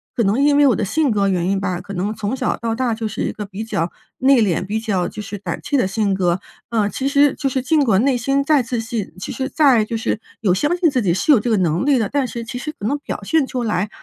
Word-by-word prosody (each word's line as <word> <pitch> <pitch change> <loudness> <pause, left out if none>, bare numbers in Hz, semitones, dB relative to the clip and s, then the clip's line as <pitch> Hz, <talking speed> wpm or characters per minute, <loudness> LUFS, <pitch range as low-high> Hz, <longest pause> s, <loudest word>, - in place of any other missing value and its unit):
可 235 - +1
能 210 +6 +2
因 290 0 +4
为 290 - +6
我 255 - +4
的 - - -1
性 290 +6 +1
格 200 -2 +1
原 180 -2 0
因 195 0 +1
吧， 185 -2 -2
可 200 - -9
能 195 +3 -2
从 210 +4 -2
小 255 -1 -1
到 230 -1 -2
大 245 0 0
就 220 0 -3
是 215 - -5
一 - - -1
个 210 - -6
比 200 +2 -6
较 170 -6 -2 0.3
内 265 -1 +5
敛、 185 -4 +1
比 210 +3 -2
较 200 -5 -1
就 210 - -7
是 205 0 -6
胆 200 - -5
怯 290 - 0
的 250 - +2
性 200 +1 0
格。 180 -1 +1 0.3
呃， 215 -3 +1
其 265 - -4
实 285 0 +4
就 275 - -1
是 260 0 -1
尽 295 +3 +2
管 215 -6 +3
内 275 -2 +3
心 275 +4 +1
再 280 -1 +3
自 235 0 -3
信， 225 -2 -4
其 - - -5
实 265 0 -3
再 270 -9 +4
就 225 +2 -3
是 220 0 -2 0.2
有 195 -5 +2
相 295 - +1
信 350 -2 +3
自 260 -3 0
己 180 -6 +1
是 295 - +3
有 255 - +5
这 240 - -2
个 220 - +3
能 175 0 +1
力 280 -3 +3
的， 220 - 0
但 280 -2 0
是 235 -2 -6
其 235 - -6
实 305 +5 -4
可 205 - -2
能 285 +5 0
表 285 - -6
现 315 +5 +2
出 255 -2 -3
来， 210 -2 -1
225 Hz, 310 characters per minute, -20 LUFS, 200-270 Hz, 0.3 s, 为